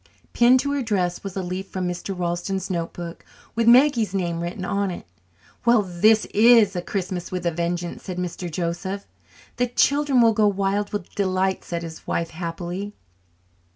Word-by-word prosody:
Pinned 245 +2 +5
to 285 - -2
her 285 -1 0
dress 185 -7 -1
was 195 -1 -6
a 190 - -2
leaf 185 +2 -4
from 185 -1 -3
Mr. 180 +2 -4
Ralston's 180 +2 -2
notebook 170 -1 -5 0.3
with 230 0 0
Maggie's 240 -5 +5
name 170 -3 -1
written 175 +2 -4
on 200 0 0
it. 175 - -7 0.6
"Well, 235 -2 +4
this 210 +4 +3
is 220 -2 +6
Christmas 185 -2 -3
with 180 -1 -4
a 170 - +2
vengeance," 170 +1 -3
said 185 -2 -6
Mr. 180 0 -4
Joseph. 180 +4 -3 0.5
"The 245 - +2
children 280 +2 +2
will 230 -1 +5
go 215 0 +3
wild 200 +1 0
with 205 -4 -5
delight," 190 -1 0
said 170 -1 -4
his 160 -1 -9
wife 170 -1 -1
happily. 175 +4 -5
190 Hz, 165 wpm, -23 LUFS, 175-215 Hz, 0.6 s, is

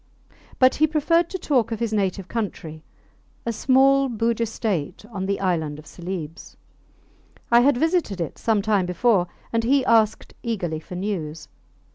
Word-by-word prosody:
But 255 0 +5
he 310 - +3
preferred 330 +3 +2
to 375 - -4
talk 255 - +1
of 225 - -3
his 230 -2 -2
native 195 -2 -1
country 170 -8 -5 0.6
a 230 - -1
small 270 +3 +4
Bugis 230 0 0
state 200 -6 -3
on 190 -3 -4
the 200 - -1
island 160 -6 -1
of 155 - -12
Celebes. 170 -1 -7 0.9
I 235 - +7
had 275 0 +4
visited 320 - 0
it 165 -4 -4
some 215 -3 +1
time 200 -4 +1
before, 180 0 +2 0.3
and 230 0 +1
he 265 +2 +2
asked 225 -3 +2
eagerly 185 -10 -2
for 180 - -10
news. 175 -5 -4
215 Hz, 155 wpm, -23 LUFS, 180-250 Hz, 0.9 s, I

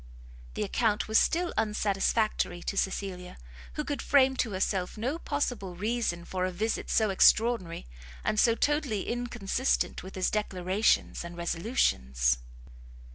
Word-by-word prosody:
The - - -1
account 210 +1 0
was 220 0 +5
still 345 +1 +1
unsatisfactory 210 -3 0
to - - -3
Cecilia, 190 -2 -3 0.4
who 300 - -3
could 290 -1 -3
frame 265 -1 +4
to 240 - 0
herself 185 +1 -1
no 260 +9 -2
possible 245 - -2
reason 205 -4 -2
for 185 0 -3
a 185 - 0
visit 215 +5 -2
so 220 -3 +2
extraordinary, 210 -3 +3 0.4
and 215 - 0
so 230 0 +4
totally 285 -8 0
inconsistent 240 0 -1
with 190 +1 -10
his 185 -1 0
declarations 195 -1 0
and 170 0 -8
resolutions. 65 - +1
210 Hz, 130 wpm, -29 LUFS, 185-240 Hz, 0.4 s, was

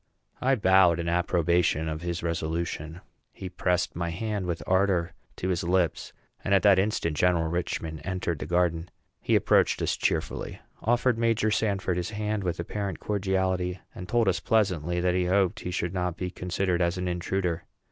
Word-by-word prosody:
I 135 +1 +3
bowed 95 -5 +4
in 85 - -3
approbation 85 -2 +1
of 80 0 -4
his 85 -1 -3
resolution. 85 0 -3 0.3
He 95 - -7
pressed 90 0 0
my 85 0 -2
hand 100 +2 -3
with 85 -1 -3
ardor 95 -3 +2 0.2
to 95 - -3
his 90 -2 0
lips; 90 -1 0 0.3
and 100 - +3
at 95 - +3
that 100 -2 +6
instant 95 -6 0
General 85 0 +2
Richman 80 -2 -3
entered 90 -4 -3
the - - -5
garden. 85 -1 +1 0.3
He - - +2
approached - - +3
us - - 0
cheerfully, - - -2 0.2
offered 120 +1 +2
Major 115 -2 +2
Sanford 100 -4 0
his 90 -1 -2
hand 105 -1 -2
with 90 -2 -2
apparent 95 +1 -4
cordiality, 95 -2 -1 0.2
and 90 0 -9
told 120 -3 +2
us 90 -3 +2
pleasantly 90 -3 +1
that 90 0 +2
he 90 0 +1
hoped 95 0 +2
he - - -5
should 90 0 -2
not 90 -2 -2
be 90 -1 -3
considered 90 0 -1
as 85 +1 +1
an 90 0 -2
intruder. 90 -1 -2
90 Hz, 175 wpm, -27 LUFS, 85-95 Hz, 0.3 s, that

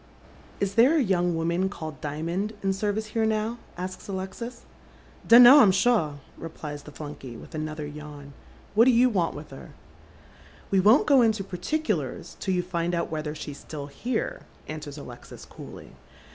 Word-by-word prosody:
" - - -24
Is 200 -1 -1
there 250 +9 +5
a 295 - +3
young 180 -4 +1
woman 170 +3 0
called 160 -6 -8
Dimond 170 +8 -3
in 195 0 +1
service 210 +2 -1
here 225 - +1
now 220 +2 0
?" - - -25
asks 185 +1 -6
Alexis. 200 +5 -6 0.6
"Dun 235 +2 +10
know, 265 +5 +10
I'm 215 -8 +7
shaw," 195 -5 +2 0.3
replies 150 -3 -7
the 150 - -12
flunkey, 145 -5 -8
with - - -13
another 155 -1 -4
yawn. 145 -1 -9 0.2
" - - -26
What 220 +3 +6
do 260 - +6
you 245 +1 +4
want 180 -6 0
with 150 0 -9
her? 135 - -11 0.3
" - - -25
" - - -24
We 195 - +4
won't 215 +9 +5
go 275 -3 +6
into 220 -3 +2
particulars 250 - -3
till 190 -2 -1
you 180 - 0
find 175 -1 -2
out 170 - -2
whether 155 -1 -3
she's 145 -2 -8
fitill 145 -2 -7
here," 235 - -3 0.3
answers 155 -1 -7
Alexis, 125 -4 -11
coolly. - - -11
185 Hz, 185 wpm, -26 LUFS, 155-220 Hz, 0.6 s, Dun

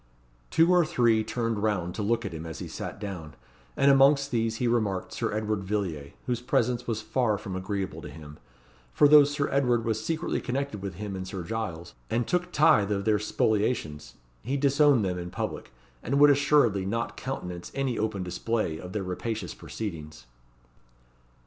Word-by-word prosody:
Two 165 +2 +4
or 180 -1 +5
three 120 -7 +2
turned 115 -1 -2
round 95 -5 0
to - - -4
look 115 +3 0
at - - -4
him 80 0 -6
as 80 -1 -7
he - - -6
sat - - -6
down; 85 -8 -7 0.4
and 140 - +5
amongst 140 +1 +5
these 115 -1 0
he 120 +2 -1
remarked 110 -5 0
Sir - - -2
Edward 105 -1 -1
Villiers, 95 -8 -3
whose 120 -2 -1
presence 125 -1 0
was 110 -2 -2
far 120 -5 +1
from 95 -2 -6
agreeable 95 +1 -3
to - - -8
him, 75 -1 -11 0.5
for 145 - +5
though 150 0 +9
Sir 145 0 -1
Edward 125 -4 +2
was 110 -1 -1
secretly 160 +3 -2
connected 135 -5 -3
with 95 -3 -5
him 100 +1 -5
and 95 0 -5
Sir 95 -2 -5
Giles, 85 - -5 0.2
and 120 +1 0
took 180 0 -1
tithe 105 - +4
of 100 -1 -1
their 105 -2 +3
spoliations, 105 -7 -1 0.3
he 135 +5 -2
disowned 140 -4 +4
them 90 -1 -2
in 90 0 -5
public, 65 - -5 0.3
and 140 +4 -1
would 145 0 +8
assuredly 140 -8 +3
not 115 +5 -2
countenance 90 -10 -6
any 135 -3 -1
open 105 -3 -1
display 90 -2 -2
of 90 +1 -8
their 105 - -2
rapacious 95 +2 -4
proceedings. 75 - -7
110 Hz, 180 wpm, -27 LUFS, 95-125 Hz, 0.5 s, though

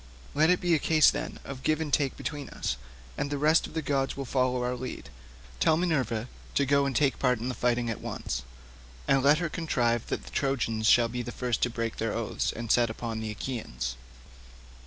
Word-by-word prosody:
Let 155 +3 +4
it 180 - +4
be 175 -2 +2
a 160 - +4
case, 155 -1 +5
then, - - -4
of 135 -1 -7
give 155 +3 +1
and 150 -3 -3
take 140 -3 +2
between 145 -2 -5
us, - - -2 0.4
and 140 - -1
the 145 - -2
rest 155 +3 +4
of - - -14
the 160 - -1
gods 135 -1 0
will 135 - -3
follow 125 -1 +1
our 125 0 0
lead. 125 - -7 0.5
Tell 155 - +4
Minerva 130 -10 0 0.3
to 140 - +3
go 140 0 +3
and 135 - -3
take 140 -4 +2
part 125 -2 +3
in 120 +3 -3
the - - -2
fight 120 -1 +1
at 115 -3 -2
once, - - -4 0.7
and 135 -1 +4
let 145 +3 +5
her 170 +1 -1
contrive 120 -9 0
that - - -3
the - - -11
Trojans 115 -5 0
shall 120 +1 +6
be 125 +1 -4
the 120 0 -5
first 125 -3 -2
to 125 - +3
break 115 -1 -3
their 115 -1 -1
oaths 115 -2 -1
and 115 -1 -3
set 120 -1 +4
upon 115 0 -4
the 110 -1 -4
Achaeans." 100 - -4
130 Hz, 220 wpm, -28 LUFS, 115-145 Hz, 0.7 s, shall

